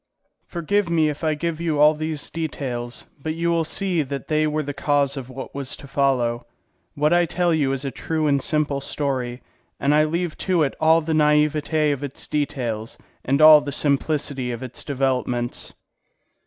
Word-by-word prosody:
Forgive 180 +3 0
me 160 -2 +3
if 150 +2 -6
I 155 -1 +1
give 165 +1 -3
you 160 -3 0
all 150 +1 +7
these 155 -1 -4
details, 130 -7 -4 0.2
but 155 +2 -3
you 170 +1 0
will 165 -1 +2
see 175 +1 0
that 140 -1 -5
they 155 0 +2
were 155 0 -1
the 145 0 -4
cause 140 -1 +1
of 130 -2 -7
what 130 0 -8
was 140 -2 -3
to - - -12
follow. 125 -4 0 0.5
What 150 +3 +2
I 175 0 +3
tell 175 +1 +1
you 145 -4 +1
is 135 +1 -3
a 135 - -2
true 155 +5 -2
and 140 -2 +2
simple 145 -2 0
story, 130 -4 -3 0.4
and 140 +1 +2
I 155 +1 +4
leave 170 +1 -2
to 180 -4 +2
it 140 - -1
all 160 +1 +5
the 160 +1 -2
naivete 150 0 +2
of 140 0 -3
its 140 -1 -5
details 125 -7 -3 0.3
and 140 +4 +2
all 155 -1 +10
the 145 0 -5
simplicity 140 -2 0
of 120 +1 -5
its 125 -1 -7
developments. 125 -3 -2
150 Hz, 185 wpm, -22 LUFS, 135-155 Hz, 0.5 s, all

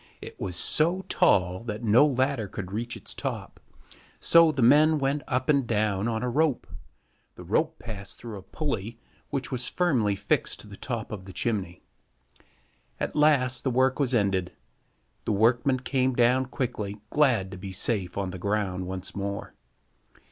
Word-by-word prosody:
It - - -11
was 90 -3 -3
so 170 - +2
tall 90 +1 +2
that 110 0 -5
no 115 +7 +5
ladder 130 -4 0
could 95 -1 -7
reach 115 +3 -4
its - - -5
top, - - -5 0.6
so 165 -1 +6
the 135 -5 0
men 155 +5 +6
went 140 +1 0
up 130 -1 -1
and 140 -5 +2
down 105 -2 0
on 115 0 -2
a - - 0
rope. 145 +1 +1 0.7
The - - -10
rope - - 0
passed 100 -4 -8
through 115 -4 -8
a - - -11
pulley 115 - -4 0.3
which 135 -1 -3
was 125 -2 -1
firmly 125 - +1
fixed - - -1
to - - -14
the 100 - -10
top 115 -1 -5
of 100 -3 -6
the 95 - -10
chimney. 95 -7 -2 1.2
At - - -3
last 140 -4 +3
the 135 - +1
work 130 +2 +2
was 130 -3 +1
ended. 95 - 0 0.7
The - - 0
workmen 120 +5 +2
came 130 -1 0
down 125 +2 +3
quickly, 110 -6 -4
glad 120 -11 +2
to 95 - -7
be 95 0 -7
safe 95 -2 0
on 95 -2 -2
the 90 - -7
ground 95 -2 -1
once 95 0 -5
more. 100 0 -4
115 Hz, 170 wpm, -27 LUFS, 100-130 Hz, 1.2 s, so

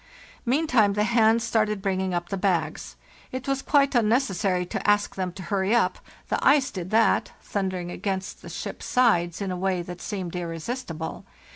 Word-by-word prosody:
Meantime 250 -7 +3
the 210 +1 +1
hands 225 0 +4
started 215 -2 +1
bringing 190 -1 -1
up 175 0 -2
the 195 - -1
bags. 175 -5 -1 0.4
It 255 +1 -5
was 275 0 0
quite 280 -1 +3
unnecessary 210 -6 +2
to 180 - -2
ask 205 0 +3
them 185 -1 -3
to 190 - -8
hurry 195 +3 +1
up—the 235 - -2
ice 275 -1 +4
did 185 -4 -5
that, 225 +2 +3
thundering 185 -3 -3
against 190 0 -4
the - - -10
ship's - - -6
sides 175 -9 +2
in 190 - -2
a - - -2
way 185 -1 0
that 175 0 -8
seemed 185 -5 -4
irresistible. 165 0 -5
195 Hz, 165 wpm, -25 LUFS, 180-230 Hz, 0.4 s, hands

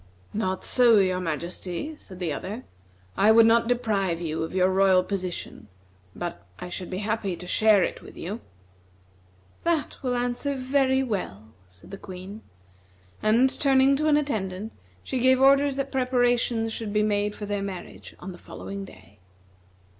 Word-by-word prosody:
"Not 190 -3 -2
so, 240 -3 +5
your 185 -2 +2
majesty," 175 - -4
said 190 -10 -13
the 175 -4 -2
other; 210 - -6 0.5
"I 215 - +5
would 225 0 +7
not 230 +1 +4
deprive 210 -8 0
you 160 -2 -3
of 160 +3 -4
your 185 -1 +4
royal 190 -1 +4
position, 185 - -5 0.5
but 175 -1 -5
I 180 - -7
should 175 0 -6
be 185 - -4
happy 210 -4 -1
to 180 - -10
share 210 +1 +4
it - - -3
with - - -13
you." 205 +7 -5 1.2
"That 335 -3 -1
will 250 -2 -1
answer 245 +3 -1
very 265 0 +2
well," 110 - -4 0.2
said 90 - -16
the 195 - -8
Queen. 190 +3 -9 0.8
And 230 +5 +4
turning 270 -1 +4
to 305 +2 0
an 295 -1 +5
attendant, 215 -7 -3 0.3
she 260 - -2
gave 260 +1 +4
orders 275 +1 +5
that 275 0 -3
preparations 245 -3 +1
should 220 -2 -5
be 210 0 +3
made 210 0 0
for 210 - -6
their 205 -1 -2
marriage 195 -2 -7
on 190 - -7
the 175 - -12
following 200 0 -7
day. 105 - -17
210 Hz, 160 wpm, -26 LUFS, 185-250 Hz, 1.2 s, would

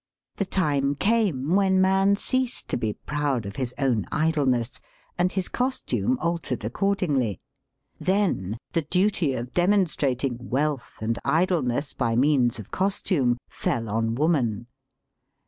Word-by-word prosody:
The 200 - 0
time 145 -7 +1
came 185 - +1
when 190 -1 +3
man 195 +1 +4
ceased 255 +3 -1
to - - 0
be 110 -3 -1
proud 145 -5 -2
of 100 0 -7
his 130 -3 -1
own 125 -7 +1
idleness, 140 -7 +1 0.4
and 180 +1 +1
his 190 -2 -1
costume 255 0 0
altered 165 -10 -2
accord 195 - 0
ingly. 130 - 0 0.6
Then 180 - 0
the 165 - +1
duty 180 -3 +1
of 120 +1 -5
demonstrating 150 -9 +1
wealth 145 0 -1
and 115 +1 -1
idleness 155 -4 +1
by 115 -3 0
means 130 -2 +3
of 110 - -10
costume 180 - +1
fell 115 -2 -2
on 115 +2 0
woman. 125 -7 +1
145 Hz, 130 wpm, -25 LUFS, 120-185 Hz, 0.6 s, man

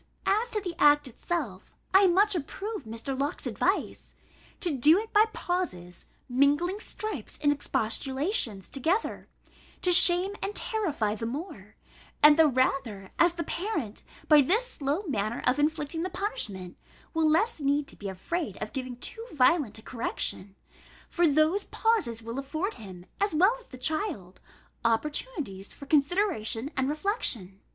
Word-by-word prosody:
As 435 +4 +1
to 430 - -2
the 365 -4 -5
act 295 -1 +5
itself, 250 - -5 0.2
I 385 0 +7
much 400 +4 +4
approve 390 - -5
Mr. 230 +5 -5
Locke's 280 +3 -3
advice, - - -2 0.4
to 345 -6 0
do 300 +7 +5
it 440 +2 -5
by 425 +1 +6
pauses, 180 - -4 0.2
mingling 290 +9 +1
stripes 430 0 -6
and 290 -1 +3
expostulations 265 - -2
together, 335 - -2 0.6
to 360 - +3
shame 360 +2 +8
and 400 +1 -3
terrify 300 - -1
the 225 +1 -4
more; 240 - -7 0.5
and 300 0 +9
the 320 0 +5
rather, 255 -7 -1
as 345 0 +5
the 340 -1 -4
parent, 330 - -4 0.3
by 300 -2 +7
this 430 - +2
slow 290 +7 -2
manner 225 - -3
of 250 +3 +2
inflicting 300 +1 -1
the 365 - -2
punishment, 195 - -4 0.4
will 320 -1 +2
less 385 +6 +1
need 285 0 +1
to - - -15
be 200 - -6
afraid 210 - -4
of 215 - -6
giving 255 -3 -5
too 450 - -5
violent 265 -4 +2
a 220 - -14
correction; 205 -5 -4 0.5
for 345 -1 +2
those 310 +7 +2
pauses 385 - 0
will 230 +3 -5
afford 310 +10 -3
him, 185 -4 -11
as 405 -4 0
well 380 +9 +4
as - - -13
the 255 - -11
child, 255 - -3 0.4
opportunities 235 - -2
for 280 - -12
consideration 285 - 0
and 265 0 0
reflection. 290 - 0
295 Hz, 150 wpm, -27 LUFS, 230-365 Hz, 0.6 s, and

